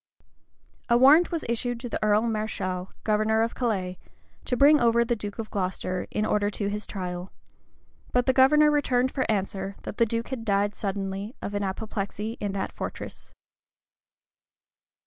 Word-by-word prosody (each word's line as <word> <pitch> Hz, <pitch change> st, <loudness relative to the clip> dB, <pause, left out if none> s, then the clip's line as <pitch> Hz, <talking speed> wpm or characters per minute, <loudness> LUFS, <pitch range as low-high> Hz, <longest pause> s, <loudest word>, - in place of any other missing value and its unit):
A 235 Hz, -, +5 dB
warrant 295 Hz, +8 st, +6 dB
was 335 Hz, -2 st, -2 dB
issued 235 Hz, +1 st, -1 dB
to 245 Hz, -, -5 dB
the 230 Hz, -, -3 dB
earl 210 Hz, +1 st, +3 dB
mareschal, 215 Hz, -5 st, -2 dB
governor 215 Hz, +1 st, +2 dB
of 230 Hz, -, -2 dB
Calais, 190 Hz, -7 st, -2 dB, 0.5 s
to 250 Hz, -, -1 dB
bring 290 Hz, +3 st, +7 dB
over 235 Hz, 0 st, +4 dB
the 240 Hz, 0 st, 0 dB
duke 205 Hz, -2 st, -6 dB
of 225 Hz, -2 st, -6 dB
Glocester, 185 Hz, -1 st, -2 dB
in 215 Hz, -, -1 dB
order 205 Hz, -1 st, +1 dB
to 200 Hz, 0 st, -2 dB
his 210 Hz, +1 st, -4 dB
trial; 180 Hz, -1 st, -5 dB, 0.8 s
but 245 Hz, 0 st, +2 dB
the 260 Hz, -, +3 dB
governor 300 Hz, +3 st, +6 dB
returned 260 Hz, -3 st, +2 dB
for 260 Hz, -4 st, -2 dB
answer, 195 Hz, -1 st, -2 dB
that -, -, -7 dB
the 230 Hz, -, +3 dB
duke 230 Hz, +1 st, -2 dB
had 255 Hz, -3 st, -4 dB
died 205 Hz, -1 st, +1 dB
suddenly 195 Hz, +2 st, -4 dB
of 205 Hz, -, -5 dB
an 205 Hz, -, -1 dB
apoplexy 210 Hz, +2 st, -4 dB
in 205 Hz, -2 st, -2 dB
that 195 Hz, -1 st, -3 dB
fortress. -, -, -7 dB
215 Hz, 165 wpm, -26 LUFS, 200-240 Hz, 0.8 s, bring